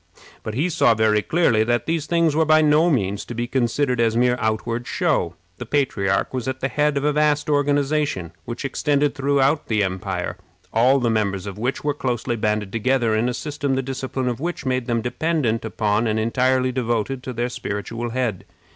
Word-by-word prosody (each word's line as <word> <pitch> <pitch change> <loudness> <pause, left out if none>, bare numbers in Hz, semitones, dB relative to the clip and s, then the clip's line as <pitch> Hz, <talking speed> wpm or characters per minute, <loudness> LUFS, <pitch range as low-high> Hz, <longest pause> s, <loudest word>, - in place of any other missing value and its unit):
But 110 - -5
he 150 +8 +1
saw 120 -9 +3
very 110 -1 +3
clearly 120 -7 +2
that 120 0 0
these 160 -2 -1
things 170 -3 +2
were 160 - +4
by 155 0 +4
no 155 +3 +4
means 100 - 0
to 120 - -7
be 120 +1 -1
considered 125 +1 0
as 115 0 +2
mere 125 0 +3
outward 115 +2 -2
show. 150 - 0 0.2
The 125 - -5
patriarch 125 -9 0
was 130 -2 -3
at 130 0 -3
the 135 - -1
head 150 0 +1
of 140 - -1
a 150 0 +2
vast 150 0 +1
organization, 145 - 0
which 120 +6 -6
extended 145 +1 +1
throughout 140 +1 +1
the 110 -2 +1
empire, 95 -1 -3 0.4
all 125 +5 +4
the 120 -3 +1
members 100 -3 -1
of 100 0 -7
which 125 +4 -2
were 145 0 +1
closely 125 -3 -2
banded 105 -2 -1
together 115 0 +1
in 110 +3 +1
a - - -2
system 145 -2 -2
the 135 - -1
discipline 130 0 -3
of 120 -1 -2
which 170 +1 -4
made 130 -1 -1
them 115 -2 0
dependent 125 -2 0
upon 110 0 0
and 110 0 0
entirely 130 +3 +1
devoted 125 0 -1
to 130 - -6
their 120 0 -1
spiritual 115 +1 -4
head. 115 -6 -2
125 Hz, 195 wpm, -22 LUFS, 110-145 Hz, 0.4 s, were